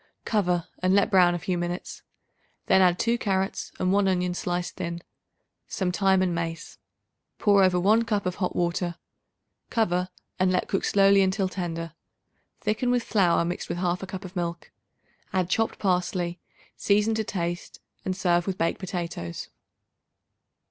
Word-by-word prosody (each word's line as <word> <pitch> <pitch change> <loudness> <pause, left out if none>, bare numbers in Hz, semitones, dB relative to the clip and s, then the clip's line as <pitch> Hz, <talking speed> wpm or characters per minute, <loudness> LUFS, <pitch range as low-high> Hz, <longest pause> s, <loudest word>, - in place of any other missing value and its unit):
Cover 180 -6 +1
and 185 +1 +2
let 200 +2 +3
brown 180 -2 +5
a - - -1
few 180 +1 -2
minutes; 175 +1 -4 0.6
then 190 0 +5
add 180 -1 +4
2 235 +3 +1
carrots 195 -2 -1
and 185 +1 +1
1 200 -1 +3
onion 180 -1 +1
sliced 175 0 -3
thin, 170 0 -4 0.6
some 185 -2 -1
thyme 190 0 +3
and 180 -2 0
mace; 165 -1 -5 0.6
pour 200 -2 +4
over 180 -1 +3
1 210 +5 +4
cup 210 -3 -1
of 180 0 -2
hot 180 - -2
water. 175 0 -1 0.7
Cover 180 -5 +1 0.3
and 185 0 +3
let 180 - 0
cook 195 - -1
slowly 195 0 +5
until 190 +1 +1
tender. 165 -3 -4 0.7
Thicken 215 +3 0
with 245 -1 +2
flour 180 -7 +2
mixed 175 +1 -4
with - - -2
1/2 180 +1 -1
cup 190 0 -7
of 185 +1 -10
milk. 170 -1 -4 0.6
Add 185 -1 0
chopped 225 +2 +1
parsley; 180 -2 -1 0.4
season 210 +2 +2
to 220 0 0
taste 175 -3 -4 0.2
and 185 0 -2
serve 175 -1 +2
with 190 -1 -2
baked 165 -1 0
potatoes. 170 - -5
185 Hz, 155 wpm, -26 LUFS, 175-195 Hz, 0.7 s, brown